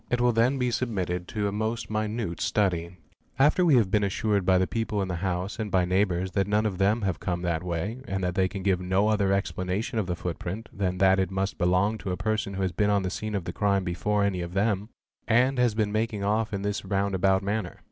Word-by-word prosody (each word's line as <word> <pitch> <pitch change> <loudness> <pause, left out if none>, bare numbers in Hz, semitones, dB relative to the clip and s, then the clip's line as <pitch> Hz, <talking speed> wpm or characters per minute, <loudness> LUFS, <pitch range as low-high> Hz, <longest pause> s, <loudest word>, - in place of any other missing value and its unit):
It 125 - +1
will 120 0 +4
then 120 +4 +2
be 125 -1 0
submitted 95 -8 -2
to 105 -2 -2
a - - -1
most 110 +2 -3
minute 110 -4 -2
study, 90 -4 0 0.4
after 150 +6 +4
we 160 -6 +5
have 110 -6 +3
been 105 -1 +3
assured 100 0 0
by 95 -1 +5
the 95 - +3
people 110 0 -2
in 95 -1 -1
the 90 - -2
house 95 +4 -3
and 110 -2 -2
by 95 -2 +2
neighbours 95 0 +1
that 100 0 0
none 105 +1 +2
of 95 -4 -2
them 105 +3 +2
have 95 -5 -1
come 90 -1 -3
that 85 -2 0
way 90 +7 -3
and 95 0 -2
that 90 -1 0
they 95 0 +2
can 95 0 -6
give 95 -2 +1
no 95 +3 +2
other 100 -3 +2
explanation 100 +5 -1
of 100 - -1
the 90 - -1
footprint 90 +5 -5
than 95 -2 -1
that 95 0 +4
it 95 -2 +1
must 95 +1 -2
belong 95 +4 +2
to 95 - -5
a 90 - -2
person 110 -2 -1
who 95 - -1
has 95 - 0
been 105 +4 +1
on 100 -1 +2
the 95 - -2
scene 110 +1 -4
of 100 - -2
the 85 - -4
crime 100 -2 +1
before 100 +4 0
any 95 -3 0
of 85 +1 -6
them 105 +1 0 0.4
and 125 +3 +3
has 120 -3 +2
been 105 -2 0
making 110 -1 -1
off 105 +2 0
in 100 -1 -3
this 105 0 -2
round 100 0 -1
about 95 +1 +2
manner. 100 -2 -2
100 Hz, 250 wpm, -27 LUFS, 90-110 Hz, 0.4 s, we